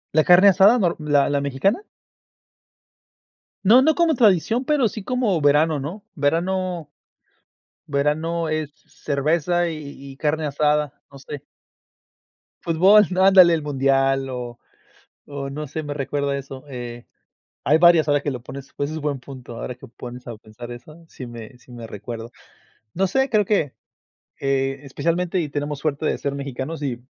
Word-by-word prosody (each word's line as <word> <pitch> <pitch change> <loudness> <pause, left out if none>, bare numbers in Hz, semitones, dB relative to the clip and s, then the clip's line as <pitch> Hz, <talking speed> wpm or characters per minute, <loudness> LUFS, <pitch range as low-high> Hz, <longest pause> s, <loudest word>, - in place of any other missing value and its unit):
¿La 155 - +5
carne 180 +4 +7
asada 200 +5 +6
nor 175 -5 +1
la 145 -2 +2
la 145 0 0
mexicana? 140 - 0 1.8
No, 240 +5 +8
no 315 +3 +3
como 340 -2 +3
tradición, 225 - +3
pero 280 -3 +2
sí 210 0 -7
como 230 -8 0
verano, 150 +1 +3
¿no? 175 +10 -7
Verano 170 +1 -1 0.9
verano 155 +4 -1
es, 155 -2 -2 0.2
cerveza 165 +4 0
y 155 -3 -7 0.2
y - - -19
carne 155 +1 -1
asada, 150 0 0
no 140 - -12
sé. 140 +1 -9 1.2
Fútbol, 190 +6 +5
ándale 190 -2 +7
el 160 - 0
mundial 135 -1 +1
o 120 -2 -6 0.7
o 140 -1 -6
no 150 +2 -5
sé, 155 +3 -5
me 145 0 -4
recuerda 140 0 -2
eso, 135 0 -8
eh, 120 -2 -8 0.6
hay 150 - +4
varias 165 -2 +5
ahora 145 0 +3
que 145 - -2
lo 125 -3 -6
pones, 135 +2 -10
pues 145 +1 -2
es 160 - -4
buen 145 -2 -2
punto 130 -3 -10
ahora 125 +2 -6
que 135 - -13
me 120 - -20
pones 125 +1 -9
a 120 - -6
pensar 110 +3 -11
eso, 155 +7 -12
sí 130 - -9
me 120 0 -10
sí 120 - -19
me 120 -2 -9
recuerdo. 115 +2 -8 0.6
No 195 - +2
sé, 265 +8 +1
creo 215 -3 +2
que, 175 -10 0 0.7
eh, 135 0 0
especialmente, 170 +6 -1
y 155 - -2
tenemos 145 0 -3
suerte 150 +1 -2
de - - 0
ser 140 -1 -3
mexicanos, 140 +3 -5
y 125 -4 -3
150 Hz, 160 wpm, -22 LUFS, 135-175 Hz, 1.8 s, No